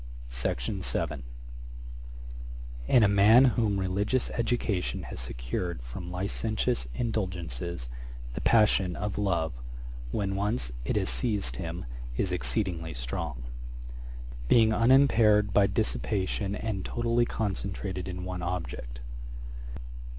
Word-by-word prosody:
Ætat - - -1
25.] 85 -6 -1 1.7
In 120 - +6
a - - +7
man 105 +6 +7
whom 105 -4 +2
religious 100 +7 +1
education 110 - 0
has - - -6
secured 60 +8 -3
from 75 +9 -6
licentious 95 - -1
indulgences, 85 - -2 0.5
the - - -4
passion 100 -5 +4
of 105 -1 -2
love, 85 -8 +1 0.6
when 95 - -1
once 100 - 0
it - - 0
has - - +1
seized 60 - -1
him, - - -4 0.3
is 95 - +1
exceedingly 90 - -1
strong; 60 +1 -3 1.0
being 110 - +6
unimpaired 115 -3 +5
by 100 -1 +6
dissipation, 95 - 0
and 105 -3 -2
totally 120 0 +2
concentrated 95 -3 -2
in 90 0 -4
one 90 -1 -3
object. 85 -9 -4
95 Hz, 105 wpm, -29 LUFS, 80-105 Hz, 1.7 s, a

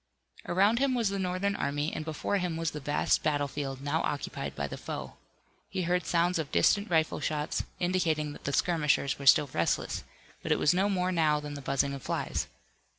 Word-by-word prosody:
Around 200 +6 +3
him 270 -1 +2
was 230 -4 +1
the 200 0 -2
Northern 185 +2 0
army, 145 +2 -1
and - - -3
before 160 +6 -1
him 180 -3 -2
was 165 -1 -1
the 150 - -6
vast 145 +1 +1
battlefield, 145 -2 -2
now 145 +3 0
occupied 145 - -3
by 70 - -2
the 70 - -5
foe. - - -6 0.6
He 185 - -2
heard 175 -1 0
sounds 175 0 +2
of 150 -3 -4
distant 205 0 +3
rifle 160 -2 +2
shots, 150 0 -2
indicating 165 -5 0
that - - -13
the 140 - 0
skirmishers 150 -3 +1
were 140 - -5
still 135 0 +6
restless, 85 - 0 0.4
but - - -3
it - - +4
was 150 - +3
no 195 +3 +2
more 185 -2 +1
now 155 -4 +2
than 150 0 -6
the 145 - -6
buzzing 140 +1 0
of 140 - -6
flies. - - -2
160 Hz, 200 wpm, -29 LUFS, 145-180 Hz, 0.6 s, still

